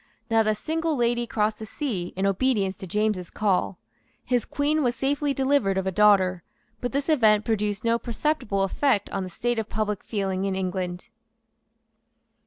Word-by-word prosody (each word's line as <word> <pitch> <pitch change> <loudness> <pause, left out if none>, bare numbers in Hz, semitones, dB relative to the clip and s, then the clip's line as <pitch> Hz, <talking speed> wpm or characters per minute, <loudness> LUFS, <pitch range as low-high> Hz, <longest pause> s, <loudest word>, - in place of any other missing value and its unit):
Not 225 -1 +3
a 215 - +2
single 320 +6 -1
lady 240 -1 +1
crossed 215 -1 0
the 220 - -6
sea 210 - -3
in 190 +1 -1
obedience 195 -1 +1
to 190 - -8
James's 210 -2 -1
call. 195 -3 0 0.5
His 245 -3 +1
Queen 295 +2 0
was 245 -3 +1
safely 285 +1 0
delivered 265 -8 +1
of 190 - -1
a 190 - 0
daughter; 190 -3 +4 0.4
but 245 - -3
this 280 0 -1
event 220 -9 +4
produced 210 -2 -1
no 230 0 +2
perceptible 235 -5 -1
effect 205 +2 +1
on 195 - -2
the 185 - -6
state 240 +5 -1
of 220 - -4
public 210 -1 -2
feeling 195 -3 -2
in 195 -1 -1
England. 185 +2 -3
215 Hz, 170 wpm, -25 LUFS, 195-250 Hz, 0.5 s, daughter